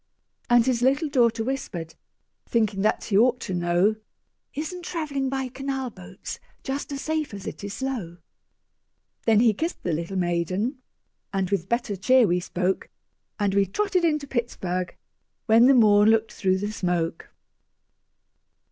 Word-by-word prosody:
And 240 -1 +5
his 250 -2 +1
little 275 +5 +2
daughter 235 -5 +2
whispered, 200 -10 -4 0.6
Thinking 215 -4 +1
that 215 - +1
he 195 - +1
ought 250 +2 +4
to 190 - -4
know, 175 +4 +2 0.6
"Isn't 335 +4 -5
travelling 290 -6 -2
by 265 -1 -2
canal 265 0 -4
boats 185 0 -9 0.2
Just 275 +1 -4
as 275 -1 -4
safe 310 -7 -2
as 200 - -9
it - - -7
is 200 0 -5
slow?" 235 -11 -4 1.1
Then 220 -1 +5
he 230 -2 +5
kissed 325 - -4
the 175 - -1
little 170 +4 -3
maiden, 185 - -1 0.5
And 195 -1 -1
with 195 -2 -1
better 235 -3 -1
cheer 250 +6 +4
we 180 -2 +1
spoke, 180 +1 -2 0.5
And 200 -2 +1
we 200 0 +3
trotted 380 - 0
into 300 -3 +1
Pittsburg, 185 -9 -3 0.5
When 230 +2 +6
the 275 - +6
morn 210 -3 +6
looked 225 0 +2
through 190 -2 +1
the 205 +2 -3
smoke. 175 -5 -2
220 Hz, 150 wpm, -25 LUFS, 190-265 Hz, 1.1 s, When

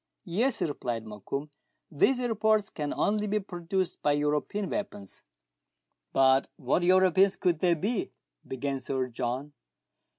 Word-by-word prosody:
"Yes," 225 +9 0
replied 120 -6 -3
Mokoum; 125 +8 -5 0.4
"these 245 - +3
reports 215 -2 +2
can 150 -2 -3
only 210 0 0
be 210 +1 +1
produced 185 -1 -3
by 145 - +3
European 150 +7 0
weapons." 105 - -5 0.5
" - - -55
But 135 0 +4
what 140 +5 0
Europeans 185 +1 +4
could 175 -4 +1
they 175 -1 +3
be 205 +7 -2 0.2
?" - - -30
began 135 +1 -3
Sir 130 -1 -2
John. 125 +4 -3
155 Hz, 135 wpm, -28 LUFS, 130-195 Hz, 0.5 s, But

